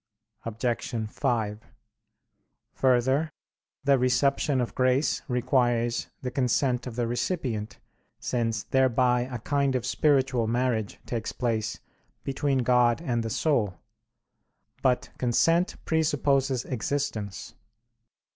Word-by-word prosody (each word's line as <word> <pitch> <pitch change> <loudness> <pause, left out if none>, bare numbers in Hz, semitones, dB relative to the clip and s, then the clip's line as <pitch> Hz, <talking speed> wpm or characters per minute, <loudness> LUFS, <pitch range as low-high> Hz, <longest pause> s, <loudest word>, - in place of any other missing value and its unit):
Obj. 115 -1 -2
5: 110 -6 -1 1.1
Further, 130 +4 +2 0.5
the 140 -1 +4
reception 135 +2 +2
of 120 - -2
grace 130 +3 +2
requires 120 -2 +1 0.2
the 125 - -2
consent 125 -1 +1
of 120 - -6
the 120 -1 0
recipient, 120 - -2 0.4
since 115 -4 -1
thereby 125 -1 +2
a 125 - -3
kind 140 +3 0
of 125 -2 -1
spiritual 130 -5 +2
marriage 120 -2 -1
takes 115 -3 -3
place 110 -3 -2 0.4
between 135 -1 0
God 120 -1 +3
and 125 -8 -1
the 115 - -3
soul. 110 - +1 1.1
But 125 -1 +1
consent 165 +9 +2
presupposes 140 -5 +1
existence. 120 -5 -3
125 Hz, 100 wpm, -27 LUFS, 115-135 Hz, 1.1 s, the